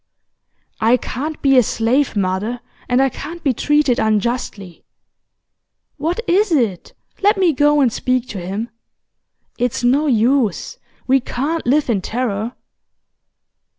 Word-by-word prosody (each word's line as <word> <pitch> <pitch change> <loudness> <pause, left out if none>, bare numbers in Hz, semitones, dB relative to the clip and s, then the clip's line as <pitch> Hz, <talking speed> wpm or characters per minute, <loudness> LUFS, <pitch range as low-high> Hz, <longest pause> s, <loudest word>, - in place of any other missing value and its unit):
'I 230 +3 +4
can't 295 +6 -5
be 270 -2 +5
a - - +6
slave, 240 +5 0
mother, 200 +5 -1 0.3
and 250 +2 +3
I 270 - +2
can't 335 +5 -8
be 270 - +2
treated 295 0 +2
unjustly.' 215 -4 -2 1.1
'What 330 +9 -2
is 395 +3 +2
it? 230 - 0 0.3
Let 410 +1 +3
me 365 -4 +3
go 295 +1 +3
and 245 -5 +2
speak 255 -1 -1
to 200 - -5
him.' 200 +7 -5 0.9
'It's 245 0 -1
no 275 +5 +3
use. 235 -3 +1 0.3
We 265 +1 +3
CAN'T 280 +5 -3
live 290 +4 +2
in 220 -6 0
terror. 225 +1 -3
250 Hz, 130 wpm, -18 LUFS, 225-290 Hz, 1.1 s, a